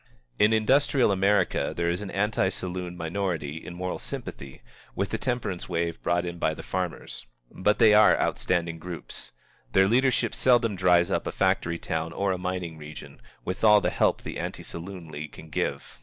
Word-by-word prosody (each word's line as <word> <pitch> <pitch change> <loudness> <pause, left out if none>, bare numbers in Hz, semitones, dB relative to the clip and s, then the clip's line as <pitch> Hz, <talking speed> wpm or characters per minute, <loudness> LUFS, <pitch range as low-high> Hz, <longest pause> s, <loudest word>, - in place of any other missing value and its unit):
In 105 +1 +5
industrial 130 +2 +3
America 100 +2 +2
there 85 - 0
is 85 +3 0
an 105 - -5
anti 100 -1 +1
saloon 90 -1 -5
minority 80 -3 -3
in 90 - -8
moral 90 +1 -3
sympathy 70 -1 -8 0.3
with - - -1
the - - -2
temperance 120 -9 -3
wave 85 -1 -2
brought 85 0 +1
in 85 0 -5
by 80 - +1
the - - -9
farmers. 90 -8 -4 0.2
But 105 +3 +1
they 110 -3 +6
are 105 0 +6
outstanding 85 -2 0
groups. 85 -9 -7 0.4
Their 95 0 +5
leadership 130 +4 +2
seldom 120 -4 +3
dries 90 -2 +3
up - - 0
a - - -1
factory 85 0 +1
town 80 0 -3
or 100 -1 0
a 90 - -2
mining 90 -3 -4
region, 75 0 -10 0.2
with 95 +4 -4
all 105 -1 +8
the - - 0
help - - +1
the - - -5
Anti - - -5
Saloon 85 0 -8
League 75 0 -7
can 80 -1 -12
give. - - -3
90 Hz, 180 wpm, -27 LUFS, 85-105 Hz, 0.4 s, all